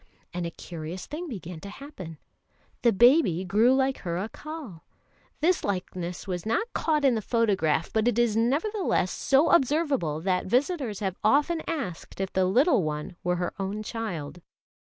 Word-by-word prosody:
And 175 Hz, -1 st, -2 dB
a -, -, -3 dB
curious 165 Hz, +1 st, -7 dB
thing 335 Hz, +4 st, -6 dB
began 180 Hz, -, -7 dB
to 200 Hz, -, -9 dB
happen: 200 Hz, -, -9 dB, 0.6 s
the 235 Hz, -, +5 dB
baby 235 Hz, -, +5 dB
grew 220 Hz, +8 st, +4 dB
like 265 Hz, 0 st, +1 dB
her 170 Hz, -3 st, -3 dB
Accal. 225 Hz, -, -7 dB, 0.6 s
This 350 Hz, +3 st, +2 dB
likeness 180 Hz, -2 st, -3 dB
was 180 Hz, -2 st, -3 dB
not 230 Hz, -, 0 dB
caught 305 Hz, -3 st, +1 dB
in 265 Hz, -, +5 dB
the 220 Hz, -, -1 dB
photograph, 195 Hz, -9 st, +1 dB
but 220 Hz, +1 st, +2 dB
is 240 Hz, -3 st, +3 dB
nevertheless 285 Hz, -, +1 dB
so 275 Hz, +4 st, +3 dB
observable 275 Hz, -, +2 dB
that 185 Hz, +1 st, 0 dB
visitors 250 Hz, -, 0 dB
have 190 Hz, -2 st, -2 dB
often 295 Hz, +9 st, +3 dB
asked 195 Hz, -, -5 dB
if 195 Hz, 0 st, -3 dB
the 190 Hz, 0 st, +3 dB
little 250 Hz, -, +4 dB
one 150 Hz, +1 st, -4 dB
were 180 Hz, 0 st, +1 dB
her 175 Hz, 0 st, -2 dB
own 200 Hz, +2 st, -3 dB
child. 180 Hz, -9 st, -5 dB
215 Hz, 155 wpm, -27 LUFS, 180-275 Hz, 0.6 s, the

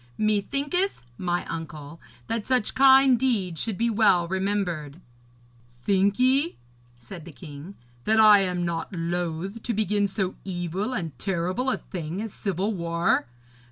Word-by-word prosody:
Methinketh, 275 Hz, -, 0 dB, 0.2 s
my 175 Hz, -1 st, -1 dB
uncle, 160 Hz, -1 st, -7 dB, 0.2 s
that 225 Hz, -1 st, -3 dB
such 255 Hz, -4 st, +1 dB
kind 265 Hz, -2 st, +6 dB
deeds 200 Hz, -, 0 dB
should 220 Hz, -5 st, -2 dB
be 235 Hz, -, +1 dB
well 205 Hz, -6 st, +3 dB
remembered.' 180 Hz, -5 st, -2 dB, 0.7 s
'Think 195 Hz, +11 st, +1 dB
ye,' 270 Hz, +6 st, +2 dB, 0.4 s
said 140 Hz, +9 st, -10 dB
the 170 Hz, -, -10 dB
king, 155 Hz, +4 st, -10 dB, 0.3 s
'that 220 Hz, +1 st, +3 dB
I 210 Hz, -2 st, +8 dB
am 180 Hz, -2 st, -1 dB
not 170 Hz, -1 st, -3 dB
loath 175 Hz, +4 st, -3 dB
to 235 Hz, -, -2 dB
begin 205 Hz, -1 st, +1 dB
so 190 Hz, -1 st, -2 dB
evil 185 Hz, +5 st, -3 dB
and 165 Hz, -, -4 dB
terrible 185 Hz, +7 st, -1 dB
a -, -, 0 dB
thing 170 Hz, 0 st, -6 dB
as 220 Hz, -1 st, -5 dB
civil 195 Hz, +2 st, -2 dB
war? 170 Hz, -6 st, 0 dB
190 Hz, 140 wpm, -25 LUFS, 170-220 Hz, 0.7 s, I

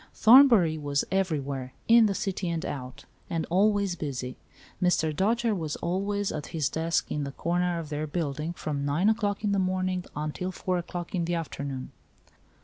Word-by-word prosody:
Thornbury 220 Hz, -, +7 dB
was 145 Hz, -1 st, 0 dB
every 190 Hz, -5 st, +1 dB
where, 135 Hz, -2 st, -5 dB
in 230 Hz, -1 st, +7 dB
the 200 Hz, -, -1 dB
city 190 Hz, -2 st, -2 dB
and 165 Hz, -1 st, -2 dB
out, 130 Hz, -2 st, -6 dB, 0.2 s
and 165 Hz, -2 st, -1 dB
always 200 Hz, 0 st, +3 dB
busy. 130 Hz, -5 st, -4 dB, 0.5 s
Mr. 160 Hz, -4 st, +2 dB
Dojere 225 Hz, +5 st, +1 dB
was 160 Hz, -5 st, -3 dB
always 200 Hz, +3 st, -1 dB
at 150 Hz, -1 st, -5 dB
his 155 Hz, -4 st, -1 dB
desk 165 Hz, +1 st, -1 dB
in 150 Hz, -, -1 dB
the 140 Hz, -1 st, -5 dB
corner 175 Hz, +2 st, 0 dB
of 165 Hz, -3 st, -5 dB
their 150 Hz, +1 st, -3 dB
building, 155 Hz, 0 st, -3 dB
from 145 Hz, -4 st, -3 dB
9 150 Hz, +8 st, +2 dB
o'clock 210 Hz, -2 st, 0 dB
in 205 Hz, -, +1 dB
the 200 Hz, -, +2 dB
morning 185 Hz, -1 st, 0 dB
until 155 Hz, +5 st, -3 dB
4 185 Hz, 0 st, -2 dB
o'clock 175 Hz, 0 st, -6 dB
in 175 Hz, -3 st, 0 dB
the 175 Hz, +1 st, -1 dB
afternoon. 140 Hz, -5 st, -5 dB
170 Hz, 175 wpm, -27 LUFS, 150-195 Hz, 0.5 s, Thornbury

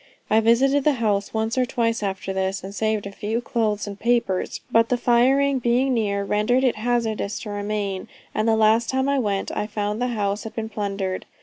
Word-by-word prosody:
I 220 Hz, -, +6 dB
visited 265 Hz, +5 st, +3 dB
the 300 Hz, -, +4 dB
house 210 Hz, -5 st, 0 dB
once 220 Hz, +3 st, -1 dB
or 255 Hz, -, +3 dB
twice 230 Hz, -2 st, 0 dB
after 195 Hz, -1 st, -3 dB
this, 190 Hz, 0 st, -2 dB
and 195 Hz, +1 st, -7 dB
saved 215 Hz, -1 st, -1 dB
a 200 Hz, -, -5 dB
few 215 Hz, +3 st, -2 dB
clothes 220 Hz, -4 st, -1 dB
and 205 Hz, -1 st, -7 dB
papers, 235 Hz, -6 st, 0 dB
but 230 Hz, 0 st, +4 dB
the 250 Hz, -, +2 dB
firing 265 Hz, +3 st, +3 dB
being 250 Hz, +2 st, +2 dB
near, 200 Hz, -4 st, 0 dB
rendered 215 Hz, +6 st, +1 dB
it 250 Hz, -4 st, +2 dB
hazardous 220 Hz, -2 st, -1 dB
to 210 Hz, -, -6 dB
remain, 205 Hz, -2 st, -3 dB, 0.3 s
and 215 Hz, +1 st, 0 dB
the 225 Hz, -, +4 dB
last 220 Hz, +1 st, +3 dB
time 265 Hz, +1 st, +1 dB
I 280 Hz, -1 st, +2 dB
went, 200 Hz, -5 st, -1 dB
I 210 Hz, -, -2 dB
found 210 Hz, +1 st, -3 dB
the 250 Hz, -, +1 dB
house 205 Hz, -3 st, -1 dB
had 220 Hz, -, -8 dB
been 220 Hz, -1 st, -3 dB
plundered. 195 Hz, -3 st, -3 dB
220 Hz, 205 wpm, -23 LUFS, 205-240 Hz, 0.3 s, I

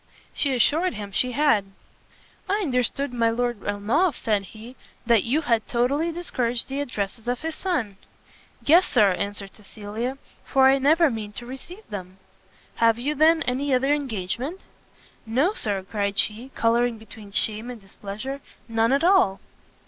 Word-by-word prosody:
She 275 Hz, -3 st, +1 dB
assured 315 Hz, +6 st, +3 dB
him 205 Hz, -1 st, -6 dB
she 250 Hz, +5 st, +1 dB
had. 240 Hz, -7 st, +3 dB, 0.9 s
"I 395 Hz, -, +3 dB
understood 250 Hz, -, 0 dB
my 230 Hz, -1 st, +2 dB
Lord 240 Hz, -2 st, -1 dB
Ernolf," 225 Hz, -, +1 dB
said 210 Hz, -3 st, 0 dB
he, 225 Hz, +5 st, -12 dB, 0.3 s
"that 230 Hz, -3 st, +4 dB
you 275 Hz, +7 st, +1 dB
had 230 Hz, -7 st, +1 dB
totally 275 Hz, +7 st, +1 dB
discouraged 250 Hz, -9 st, -2 dB
the 270 Hz, +1 st, -3 dB
addresses 220 Hz, -3 st, -4 dB
of 245 Hz, 0 st, -1 dB
his 320 Hz, 0 st, -3 dB
son?" 280 Hz, -, -2 dB, 0.7 s
"Yes, 345 Hz, +5 st, +6 dB
Sir," 210 Hz, -6 st, +4 dB
answered 200 Hz, +1 st, -3 dB
Cecilia, 215 Hz, +5 st, -5 dB, 0.3 s
"for 265 Hz, -1 st, +4 dB
I 270 Hz, +1 st, +5 dB
never 310 Hz, +3 st, +4 dB
mean 215 Hz, -2 st, -5 dB
to 240 Hz, -, -7 dB
receive 305 Hz, -, -9 dB
them." 185 Hz, -2 st, -7 dB, 0.6 s
"Have 230 Hz, -1 st, +4 dB
you, 275 Hz, +5 st, -1 dB
then, 320 Hz, +2 st, +4 dB
any 265 Hz, +2 st, 0 dB
other 270 Hz, +3 st, +2 dB
engagement?" 265 Hz, -, -3 dB, 0.7 s
"No, 270 Hz, -, +2 dB
Sir," 200 Hz, -, -1 dB
cried 200 Hz, 0 st, -2 dB
she, 225 Hz, +5 st, 0 dB
colouring 235 Hz, +1 st, +2 dB
between 220 Hz, -1 st, -12 dB
shame 215 Hz, +3 st, 0 dB
and 245 Hz, -2 st, -7 dB
displeasure, 205 Hz, +7 st, -7 dB, 0.3 s
"none 225 Hz, 0 st, +1 dB
at 275 Hz, +3 st, +2 dB
all." 345 Hz, -, +4 dB
240 Hz, 155 wpm, -24 LUFS, 210-280 Hz, 0.9 s, Yes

